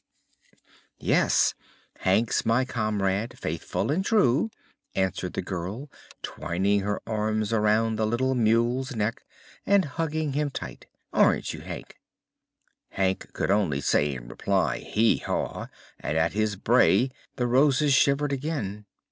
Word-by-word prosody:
"Yes; - - +3 0.5
Hank's 110 +5 +2
my 115 +3 +2
comrade, 110 -1 -1
faithful 80 - -3
and 180 +6 +1
true," 205 - +3 0.5
answered 95 -2 -1
the - - -3
girl, 95 - -5 0.3
twining 95 +4 0
her 100 +1 -2
arms 110 0 -1
around 110 +1 +2
the 110 0 +1
little 130 +4 +1
mule's 120 +3 +1
neck 110 +1 -1 0.4
and 200 -1 +3
hugging 155 0 -2
him 145 +1 0
tight. - - -8 0.3
"Aren't - - +3
you, - - -7
Hank?" - - -9 0.9
Hank 95 -1 -1
could - - -1
only 95 -9 +1
say 70 0 +1
in - - -9
reply: - - 0
"Hee 110 +2 +2
haw!" - - -3 0.3
and 75 - -2
at 80 +1 +1
his 105 0 0
bray 125 +4 +3 0.2
the 125 - -1
Roses 140 +3 +3
shivered 140 +1 +3
again. 115 -8 -4
115 Hz, 130 wpm, -26 LUFS, 100-135 Hz, 0.9 s, Yes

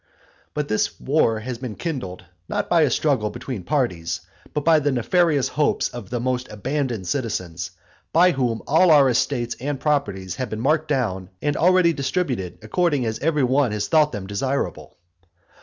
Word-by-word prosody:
But 150 -1 -1
this 110 - -1
war 130 -6 +1
has 120 +1 -5
been 120 -5 -5
kindled, 125 - -5 0.2
not - - -1
by 170 -2 +4
a 150 - +4
struggle 125 -5 +1
between 120 -1 -6
parties, 90 - -1 0.3
but 150 -2 -3
by 160 -1 +6
the 145 -1 +1
nefarious 145 +3 +2
hopes 150 -1 +1
of 120 -6 -9
the 120 - -2
most 125 0 -2
abandoned 120 -2 -2
citizens, 90 - -3 0.4
by 180 +3 +5
whom 125 -6 -1
all 165 +5 +4
our 145 -4 +6
estates 120 -1 0
and 140 +2 -3
properties 100 - -1
have 130 - -3
been 110 - -4
marked 155 +5 +1
down, 105 -10 -1
and 145 +6 -1
already 180 -1 +4
distributed 130 - -2
according 145 +2 +1
as 110 0 -2
every 150 -2 +1
one 130 -1 +2
has 105 -1 -2
thought 155 -2 +4
them 105 -4 -5
desirable. 130 +8 -3
130 Hz, 170 wpm, -23 LUFS, 110-150 Hz, 0.4 s, by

